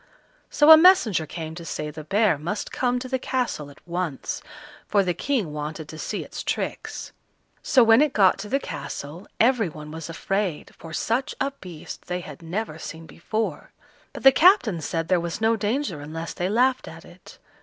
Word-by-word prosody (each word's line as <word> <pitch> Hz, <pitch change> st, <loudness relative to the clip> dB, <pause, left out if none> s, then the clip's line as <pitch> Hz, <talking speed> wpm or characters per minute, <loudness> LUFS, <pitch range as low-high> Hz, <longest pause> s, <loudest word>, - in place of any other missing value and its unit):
So 300 Hz, +1 st, +6 dB
a 315 Hz, -, +12 dB
messenger 280 Hz, -, +5 dB
came 160 Hz, +1 st, -6 dB
to 170 Hz, +1 st, -8 dB
say 150 Hz, -2 st, -4 dB
the 155 Hz, +1 st, -8 dB
bear 195 Hz, 0 st, +2 dB
must 175 Hz, +8 st, -4 dB
come 250 Hz, -1 st, 0 dB
to 250 Hz, +1 st, -5 dB
the 260 Hz, 0 st, -1 dB
castle 245 Hz, -, -2 dB
at 145 Hz, -, -18 dB
once, 175 Hz, -5 st, -3 dB, 0.5 s
for 200 Hz, -1 st, +3 dB
the 180 Hz, -1 st, 0 dB
King 215 Hz, -, -1 dB
wanted 150 Hz, +1 st, -5 dB
to 160 Hz, -, -9 dB
see -, -, -3 dB
its -, -, -7 dB
tricks. -, -, -4 dB, 0.5 s
So 260 Hz, -4 st, +5 dB
when 225 Hz, +3 st, +6 dB
it 300 Hz, -2 st, +3 dB
got 195 Hz, -4 st, +4 dB
to 205 Hz, +1 st, -6 dB
the 275 Hz, -, +1 dB
castle 160 Hz, -, -7 dB
every 230 Hz, -5 st, +3 dB
one 150 Hz, -1 st, -10 dB
was 160 Hz, +1 st, -7 dB
afraid, 190 Hz, 0 st, -2 dB
for 165 Hz, -, -11 dB
such 230 Hz, +10 st, -1 dB
a 275 Hz, +1 st, 0 dB
beast 180 Hz, -, -10 dB
they 180 Hz, 0 st, -3 dB
had 150 Hz, -3 st, -10 dB
never 165 Hz, 0 st, -4 dB
seen 160 Hz, +1 st, -8 dB
before; 220 Hz, +7 st, -4 dB, 0.4 s
but -, -, -9 dB
the 270 Hz, -, +9 dB
captain 280 Hz, -, +4 dB
said 165 Hz, +1 st, -2 dB
there 185 Hz, 0 st, +3 dB
was 170 Hz, +2 st, -4 dB
no 225 Hz, +1 st, +3 dB
danger 210 Hz, -, -2 dB
unless 160 Hz, +3 st, -6 dB
they 180 Hz, +1 st, -2 dB
laughed 255 Hz, +4 st, +2 dB
at -, -, -11 dB
it. -, -, -15 dB
185 Hz, 190 wpm, -24 LUFS, 160-245 Hz, 0.5 s, a